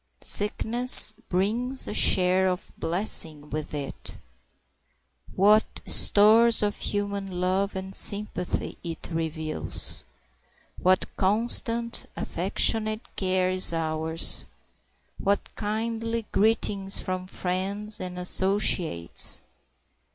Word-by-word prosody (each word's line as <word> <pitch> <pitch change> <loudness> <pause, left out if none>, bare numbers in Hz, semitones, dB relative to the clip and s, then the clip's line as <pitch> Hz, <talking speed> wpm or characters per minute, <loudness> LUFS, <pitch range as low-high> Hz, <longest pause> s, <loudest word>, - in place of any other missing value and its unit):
Sickness 225 +3 +7 0.2
brings 230 +8 +2
a - - -6
share 185 -1 +2
of 180 -1 -5
blessings 160 -5 -2
with 155 0 -6
it. 140 -2 -8 1.2
What 210 +3 +1
stores 220 +2 +4
of 205 0 -2
human 200 -2 -5
love 190 +2 -2
and 190 0 -8
sympathy 200 -4 -2
it 165 0 -7
reveals! 160 -1 -5 0.8
What 185 +1 0
constant, 230 +3 +1
affectionate 215 0 -3
care 185 -1 -2
is 185 -2 +2
ours! 160 0 -2 0.7
what 200 +1 -3
kindly 225 +1 -5
greetings 200 -2 -1
from 185 -1 -6
friends 195 +4 +1
and 180 -1 -8
associates! 180 - -1
195 Hz, 90 wpm, -24 LUFS, 180-215 Hz, 1.2 s, Sickness